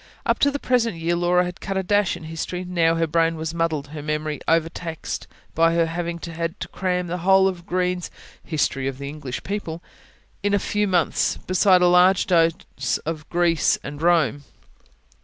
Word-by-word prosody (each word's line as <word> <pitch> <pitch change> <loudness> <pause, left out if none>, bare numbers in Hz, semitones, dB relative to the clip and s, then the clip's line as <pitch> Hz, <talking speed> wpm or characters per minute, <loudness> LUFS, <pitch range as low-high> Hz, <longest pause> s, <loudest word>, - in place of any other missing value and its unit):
Up - - +1
to 285 - +4
the 285 - -2
present 235 -8 +1
year 165 +1 0
Laura 175 +1 +2
had 180 0 -7
cut 195 0 -3
a 190 - 0
dash 205 0 +1
in - - -12
history; 165 +3 -4
now 170 -2 +2
her 165 0 +1
brain 165 +1 +1
was 160 0 -4
muddled, 160 -4 -1
her 150 0 -7
memory 150 0 -3
overtaxed, 165 0 -2 0.3
by 165 +1 +3
her 170 -1 +3
having 170 +1 -3
had 165 +1 -5
to - - -5
cram 180 -1 -1
the 175 +1 -4
whole 190 +2 +5
of 180 -2 -4
Green's 180 0 -1 0.3
HISTORY 135 -4 -1
OF 135 -1 -3
THE 140 0 -6
ENGLISH 140 -4 -6
PEOPLE 180 -4 -4 0.6
in 205 0 +1
a - - +4
few 210 +1 0
months, 180 -4 +1
besides 185 0 +4
a - - +6
large 180 +1 +5
dose 165 +1 +1
of 155 -1 -5
GREECE 170 -2 +2
and 145 +2 -7
ROME. 160 -6 +2
170 Hz, 185 wpm, -23 LUFS, 160-180 Hz, 0.6 s, a